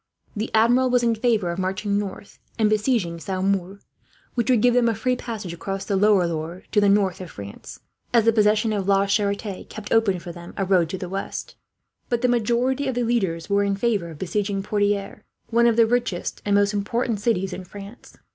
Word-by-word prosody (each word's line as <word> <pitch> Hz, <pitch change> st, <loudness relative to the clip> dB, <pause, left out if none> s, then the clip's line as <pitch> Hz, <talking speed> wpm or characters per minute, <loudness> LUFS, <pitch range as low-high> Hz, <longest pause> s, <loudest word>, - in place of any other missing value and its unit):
The 215 Hz, +2 st, -2 dB
Admiral 245 Hz, +4 st, +4 dB
was 245 Hz, -1 st, +2 dB
in 235 Hz, -1 st, +3 dB
favour 220 Hz, -5 st, +1 dB
of 170 Hz, -, -5 dB
marching 200 Hz, +2 st, -1 dB
north 200 Hz, 0 st, -7 dB, 0.2 s
and 215 Hz, -1 st, +2 dB
besieging 210 Hz, -6 st, 0 dB
Saumur, 190 Hz, +1 st, -2 dB, 0.5 s
which 240 Hz, 0 st, -1 dB
would 245 Hz, -4 st, +3 dB
give 245 Hz, -1 st, +5 dB
them 240 Hz, -1 st, +3 dB
a 225 Hz, -, 0 dB
free 250 Hz, +4 st, 0 dB
passage 220 Hz, -8 st, -6 dB
across 195 Hz, +3 st, -5 dB
the 200 Hz, -, -1 dB
lower 200 Hz, -2 st, +4 dB
Loire 170 Hz, +2 st, -4 dB
to 210 Hz, -, +3 dB
the 205 Hz, -, +4 dB
north 195 Hz, -2 st, +2 dB
of 180 Hz, -, -7 dB
France, 100 Hz, 0 st, -10 dB, 0.3 s
as 235 Hz, -2 st, +4 dB
the 230 Hz, -, +5 dB
possession 215 Hz, 0 st, +3 dB
of 200 Hz, -2 st, -2 dB
La 195 Hz, 0 st, +4 dB
Charite 200 Hz, -1 st, -1 dB
kept 215 Hz, -1 st, -8 dB
open 225 Hz, -5 st, +3 dB
for 175 Hz, 0 st, -8 dB
them 175 Hz, 0 st, -11 dB
a 195 Hz, -, 0 dB
road 180 Hz, -4 st, +3 dB
to 190 Hz, -, -4 dB
the 180 Hz, -, -5 dB
west; 195 Hz, +2 st, -5 dB, 0.5 s
but 240 Hz, 0 st, -1 dB
the -, -, +5 dB
majority 245 Hz, +3 st, +1 dB
of 260 Hz, -, -1 dB
the 245 Hz, -, 0 dB
leaders 190 Hz, -9 st, -1 dB
were 200 Hz, 0 st, +2 dB
in 200 Hz, 0 st, 0 dB
favour 205 Hz, -5 st, 0 dB
of 160 Hz, -, -10 dB
besieging 195 Hz, +3 st, -2 dB
Poitiers, 205 Hz, 0 st, -1 dB, 0.3 s
one 235 Hz, +1 st, +4 dB
of 230 Hz, -, +3 dB
the 230 Hz, 0 st, +5 dB
richest 230 Hz, -6 st, -1 dB
and 205 Hz, -1 st, +2 dB
most 205 Hz, +1 st, +3 dB
important 225 Hz, +2 st, -1 dB
cities 195 Hz, -4 st, 0 dB
in 185 Hz, -, -6 dB
France. 200 Hz, +5 st, -12 dB
205 Hz, 210 wpm, -23 LUFS, 190-230 Hz, 0.5 s, give